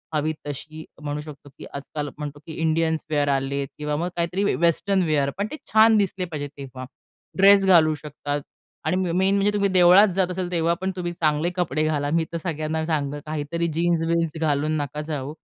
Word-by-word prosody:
हवी 155 +1 0
तशी 155 +2 -7 0.2
म्हणू 145 0 -3
शकतो, 150 -1 -11
की - - -9
आजकाल 145 +1 -5
म्हणतो, 145 -1 -6
की 160 - -8
इंडियन्स 160 0 +1
वेअर 145 -2 +1
आलेत 135 +1 -2
किंवा 150 0 -2
मग 175 +3 -1
काहीतरी 175 +3 0
वेस्टर्न 185 +3 +2
वेअर 145 -3 +1
पण 200 - -1
ते - - -4 0.2
छान 220 0 +6
दिसले 195 -2 0
पाहिजे 150 -4 -5
तेव्हा. 130 -2 -8 0.5
ड्रेस 195 0 +7
घालू 165 -4 +5
शकतात 145 -1 -5 0.4
आणि 155 +4 +1 0.2
मेन 190 +3 +2
म्हणजे 200 +1 +2
तुम्ही 200 -1 +1
देवळात 185 +2 +7
जात 185 -2 +1
असाल 180 0 -3
तेव्हा 170 0 +1
पण 190 - -1
तुम्ही 175 -1 -3
चांगले 155 0 +1
कपडे 155 -4 0
घाला. 145 -2 0
मी 165 +1 +2
तर 170 - -1
सगळ्यांना 160 -1 -3
सांगेल 145 -3 -1
काहीतरी 155 +2 -2
जीन्स-विन्स 165 -1 0
घालून 155 0 +1
नका 145 +2 -4
जाऊ. 150 -2 -4
160 Hz, 180 wpm, -24 LUFS, 150-175 Hz, 0.5 s, ड्रेस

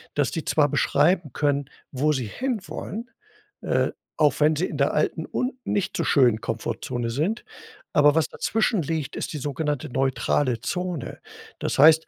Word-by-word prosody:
dass 145 -4 +1
die 160 - -3
zwar 145 -2 +3
beschreiben 150 +3 +2
können, 145 -2 0 0.2
wo 145 +3 +1
sie 130 -5 -1
hinwollen, 235 - -4 0.5
äh, - - +1 0.3
auch 145 -3 +3
wenn 155 +1 +4
sie 165 +5 0
in 150 - -5
der 140 0 +2
alten 155 +1 0
und 255 +1 -1
nicht 200 - -1
so - - 0
schönen 120 -6 +4
Komfortzone 115 +1 -3
sind, 170 - -1 0.5
aber 145 0 +5
was 160 - +3
dazwischen 220 -2 0
liegt, 155 -2 -3
ist - - -4
die 150 - -3
sogenannte 145 0 -2
neutrale 130 -1 +1
Zone. 180 -6 -3 0.4
Das - - -2
heißt 160 +3 +7
150 Hz, 160 wpm, -25 LUFS, 135-165 Hz, 0.5 s, heißt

